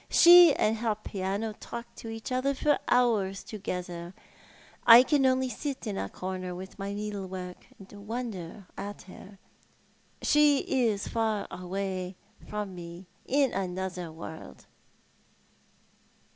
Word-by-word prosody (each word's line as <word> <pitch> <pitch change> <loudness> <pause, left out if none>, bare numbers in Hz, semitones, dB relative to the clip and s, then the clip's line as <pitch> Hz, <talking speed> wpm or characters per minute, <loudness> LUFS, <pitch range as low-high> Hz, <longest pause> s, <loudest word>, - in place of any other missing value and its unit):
She 345 -1 +9
and 220 +1 +1
her 220 -1 0
piano 205 +1 -3
talk 235 +2 -8
to 225 - -8
each 225 +2 -6
other 265 +2 0
for 295 +1 +2
hours 215 -6 +2
together. 180 -4 -6 0.7
I 240 +1 +10
can 270 0 +3
only 260 0 +2
sit 275 +1 -5
in 210 -3 -3
a 100 - -3
corner, 185 - -5
at 190 +2 -10
my 195 +1 -3
needlework, 190 -3 -6
and 200 +1 -13
wonder 210 -6 -5
at 205 +1 -7
her. 195 +1 -13 0.9
She 295 -1 +5 0.3
is 205 -2 -1
far 220 -2 -1
away 185 0 -4 0.3
from 210 -2 -4
me 175 +1 -9
— - - -36
in 275 -1 +2
another 185 -2 -3
world." 160 - -10
200 Hz, 130 wpm, -29 LUFS, 185-235 Hz, 0.9 s, I